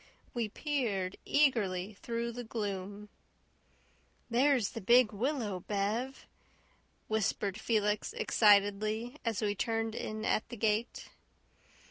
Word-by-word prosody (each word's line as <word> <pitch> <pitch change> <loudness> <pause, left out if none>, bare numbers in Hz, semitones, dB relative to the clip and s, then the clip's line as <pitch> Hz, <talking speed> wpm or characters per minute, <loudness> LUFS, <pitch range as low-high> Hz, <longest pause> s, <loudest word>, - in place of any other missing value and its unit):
We 235 -3 -1
peered 210 -10 -2
eagerly 215 -9 +2
through 235 0 -2
the 245 +1 -6
gloom. 205 -2 -5 1.2
"There's 250 -3 +3
the - - -7
big 235 +3 +5
willow, 225 -4 -1
Bev," 210 +8 -2 0.8
whispered 210 -2 -1
Felix 210 - 0
excitedly, 215 - +3
as 225 -3 -1
we 205 -1 +1
turned 225 +2 -1
in 215 -1 -4
at 220 - 0
the 240 - -7
gate. 220 +2 -1
220 Hz, 105 wpm, -32 LUFS, 205-240 Hz, 1.2 s, big